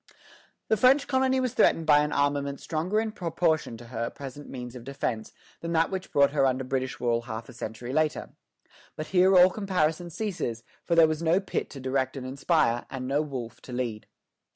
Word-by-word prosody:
The 220 - +2
French 265 +5 +5
colony 260 -1 +2
was 255 -2 -1
threatened 165 -9 +3
by 150 -1 +6
an 150 0 0
armament 140 -1 0
stronger 170 +7 -1
in 220 0 -1
proportion 165 - -1
to 120 - -12
her 115 -1 -3
present 140 +1 -9
means 125 -1 -7
of 125 - -9
defence 120 -4 -3 0.3
than 170 0 -4
that 165 0 +2
which 190 0 -5
brought 140 0 +4
her 140 -2 +3
under 130 0 0
British 130 0 -3
rule 120 -1 +1
half 115 -1 -7
a - - -10
century 120 +2 -6
later. 155 0 0 0.6
But 155 - -4
here 185 +1 +5
all 180 +1 +7
comparison 175 -4 0
ceases; 165 - -3 0.2
for 170 - 0
there 165 -1 +7
was 155 0 -2
no 170 +3 +3
Pitt 195 - -3
to 140 - -9
direct 130 +1 -1
and 130 - -6
inspire, 130 -3 +1
and 130 -1 -5
no 140 +3 +1
Wolfe 130 -6 -6
to - - -11
lead. 120 -4 -3
145 Hz, 200 wpm, -27 LUFS, 125-170 Hz, 0.6 s, all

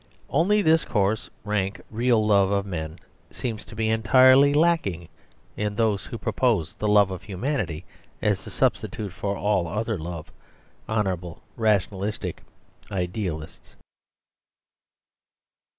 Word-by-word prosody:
Only 200 +8 +3
this 160 -1 +4
coarse, 105 0 0
rank, 100 -2 -1
real 115 -1 +2
love 100 -2 +4
of 100 0 0
men 80 -4 -5 0.3
seems 110 -4 -5
to - - -12
be 110 0 0
entirely 130 +5 +6
lacking 145 - +1 0.5
in 105 0 -2
those 105 -3 0
who - - -6
propose 80 0 0
the 105 - -3
love 105 -2 +5
of 95 - -5
humanity 95 - -3 0.3
as - - 0
a - - -5
substitute 100 -4 -1
for 100 +1 -3
all 100 -4 +1
other 110 +3 -2
love; 80 -1 -7 0.6
honourable, 95 -6 -2
rationalistic 105 -2 -1 0.5
idealists. 90 -4 -4
105 Hz, 120 wpm, -25 LUFS, 95-110 Hz, 0.6 s, entirely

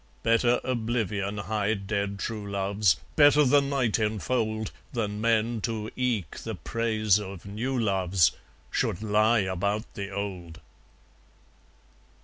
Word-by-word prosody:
Better 120 +2 +3
oblivion 110 -5 -1
hide 100 0 -1
dead 100 -1 -2
true 105 -1 -4
loves, 100 -2 +2 0.2
Better 145 0 +6
the 145 +1 +5
night 135 -5 0
enfold, 110 0 -1 0.2
Than 105 -3 -2
men, 115 0 +1
to 110 -1 -3
eke 115 -11 -1
the - - -5
praise 110 -3 +1
of 95 -3 -8
new 115 +7 -3
loves, 95 -6 +2 0.4
Should 95 - -1
lie 110 +2 +3
about 100 +3 -1
the 100 -1 -5
old! 95 -5 -5
105 Hz, 120 wpm, -27 LUFS, 100-115 Hz, 0.4 s, Better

